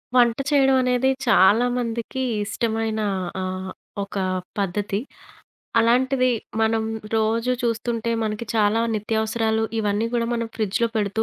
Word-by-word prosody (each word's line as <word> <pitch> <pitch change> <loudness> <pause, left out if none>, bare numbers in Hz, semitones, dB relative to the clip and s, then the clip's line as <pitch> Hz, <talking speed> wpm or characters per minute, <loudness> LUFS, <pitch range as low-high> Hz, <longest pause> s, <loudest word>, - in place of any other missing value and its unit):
వంట 240 -2 +5
చేయడమనేది 265 -2 +3 0.2
చాలా 220 +2 +5
మందికి 235 +1 -3 0.2
ఇష్టమైన 220 +1 -1 0.4
ఆహ్, 185 0 -4 0.3
ఒక 200 - -10 0.4
పద్ధతి. 200 +1 -1 0.8
అలాంటిది 255 +3 +3 0.3
మనం 220 0 +2 0.3
రోజు 225 +3 +1
చూస్తుంటే 230 0 -1
మనకి 215 +2 -3
చాలా 215 0 +3
నిత్యావసరాలు 220 +1 0 0.2
ఇవన్నీ 210 +1 0
గూడా 235 -1 +1
మనం 230 -1 -2
ఫ్రిడ్జ్‌లో 220 +1 0
పెడుతూ 210 +1 0
225 Hz, 105 wpm, -23 LUFS, 215-235 Hz, 0.8 s, వంట